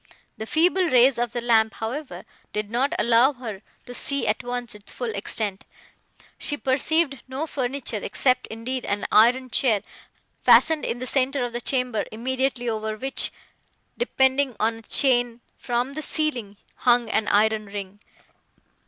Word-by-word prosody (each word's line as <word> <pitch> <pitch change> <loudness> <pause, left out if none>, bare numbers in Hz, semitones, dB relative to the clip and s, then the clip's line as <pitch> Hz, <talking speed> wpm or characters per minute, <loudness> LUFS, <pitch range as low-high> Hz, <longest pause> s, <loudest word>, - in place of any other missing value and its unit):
The 220 - -7
feeble 355 +4 +2
rays 255 -1 +5
of 240 -2 -1
the 240 - -3
lamp, 220 -2 +3
however, 225 - -5 0.3
did 210 0 -3
not 260 +4 +1
allow 240 +4 +4
her 225 -7 -7 0.2
to 245 - -9
see 280 +2 0
at 215 +4 0
once 245 -1 -4
its 210 0 -9
full 240 -3 -4
extent; 200 -1 -3 0.8
she 290 - -2
perceived 275 +1 +1
no 265 +4 -3
furniture, 260 -5 -3
except, 255 +4 +1
indeed, 245 +3 -4
an 205 0 -2
iron 245 +3 +4
chair, 225 -7 +2 0.6
fastened 320 -2 +5
in 235 - -2
the 255 - -5
centre 270 0 0
of 240 -1 -4
the 240 - -3
chamber, 250 -4 0
immediately 255 +2 -2
over 220 -1 -2
which, 270 +4 -1 0.6
depending 265 - +1
on 225 +1 +1
a - - -14
chain 245 -1 +1 0.2
from 245 +2 -1
the 310 - -4
ceiling, 255 -10 -2 0.2
hung 240 -1 +3
an 220 - 0
iron 215 0 +2
ring. 200 0 -7
245 Hz, 155 wpm, -24 LUFS, 220-265 Hz, 0.8 s, rays